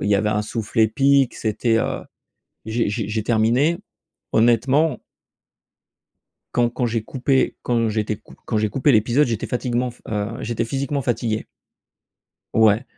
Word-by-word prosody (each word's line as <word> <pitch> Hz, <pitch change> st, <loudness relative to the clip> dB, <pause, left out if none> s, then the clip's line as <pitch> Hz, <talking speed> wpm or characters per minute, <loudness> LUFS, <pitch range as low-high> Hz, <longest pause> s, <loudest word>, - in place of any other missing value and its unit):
il 100 Hz, -, 0 dB
y 105 Hz, -, +4 dB
avait 105 Hz, +1 st, 0 dB
un 105 Hz, 0 st, 0 dB
souffle 110 Hz, +2 st, -4 dB
épique 135 Hz, +4 st, +3 dB
c'était, 115 Hz, +1 st, +1 dB
heu, -, -, -2 dB, 0.6 s
j'ai 110 Hz, -1 st, 0 dB
j'ai 105 Hz, 0 st, -2 dB
j'ai 110 Hz, 0 st, -2 dB
terminé, 120 Hz, +9 st, +2 dB, 0.6 s
honnêtement 130 Hz, +6 st, +3 dB, 1.6 s
quand 120 Hz, -1 st, +3 dB
quand 120 Hz, 0 st, -1 dB
j'ai 115 Hz, -1 st, -1 dB
coupé, 130 Hz, +2 st, 0 dB
quand 115 Hz, -2 st, +1 dB
j'étais 110 Hz, 0 st, -1 dB
cou -, -, -16 dB
quand 110 Hz, -, 0 dB
j'ai 110 Hz, 0 st, +1 dB
coupé 135 Hz, +4 st, +2 dB
l'épisode 120 Hz, +7 st, +3 dB
j'étais 115 Hz, -4 st, -3 dB
fatiguement 125 Hz, 0 st, -1 dB, 0.2 s
heu, 105 Hz, 0 st, -1 dB
j'étais 115 Hz, 0 st, -2 dB
physiquement 140 Hz, +3 st, -2 dB
fatigué. 115 Hz, -3 st, -1 dB, 1.1 s
Ouais. 110 Hz, +2 st, +4 dB
115 Hz, 145 wpm, -22 LUFS, 110-125 Hz, 1.6 s, y